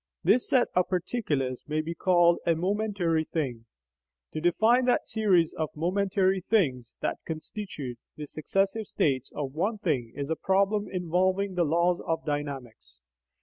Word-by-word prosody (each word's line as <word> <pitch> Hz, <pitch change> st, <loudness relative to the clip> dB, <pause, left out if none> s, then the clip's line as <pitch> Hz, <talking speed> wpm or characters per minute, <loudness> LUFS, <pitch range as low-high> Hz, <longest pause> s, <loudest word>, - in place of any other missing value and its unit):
This 250 Hz, -, +3 dB
set 255 Hz, -2 st, +3 dB
of 180 Hz, 0 st, +2 dB
particulars 160 Hz, -, -1 dB
may 155 Hz, +1 st, -1 dB
be 160 Hz, +2 st, -3 dB
called 175 Hz, -1 st, +4 dB
a 165 Hz, -, +4 dB
"momentary 185 Hz, -3 st, 0 dB
thing." 125 Hz, -8 st, -4 dB, 0.7 s
To 155 Hz, -, -3 dB
define 220 Hz, +9 st, +3 dB
that 245 Hz, -, +2 dB
series 190 Hz, -7 st, +2 dB
of 155 Hz, -2 st, -2 dB
"momentary 190 Hz, +3 st, +1 dB
things" 135 Hz, -, 0 dB
that -, -, -2 dB
constitute 155 Hz, -, -6 dB, 0.2 s
the 150 Hz, -, -6 dB
successive 195 Hz, +8 st, -1 dB
states 135 Hz, -3 st, 0 dB
of 140 Hz, -3 st, -4 dB
one 200 Hz, +8 st, -1 dB
thing 135 Hz, -, -1 dB
is 140 Hz, +2 st, -4 dB
a -, -, +2 dB
problem 200 Hz, +4 st, +1 dB
involving 185 Hz, +2 st, 0 dB
the 175 Hz, -2 st, +1 dB
laws 170 Hz, +3 st, +2 dB
of 165 Hz, 0 st, -1 dB
dynamics. 140 Hz, -, -5 dB
170 Hz, 145 wpm, -28 LUFS, 150-195 Hz, 0.7 s, called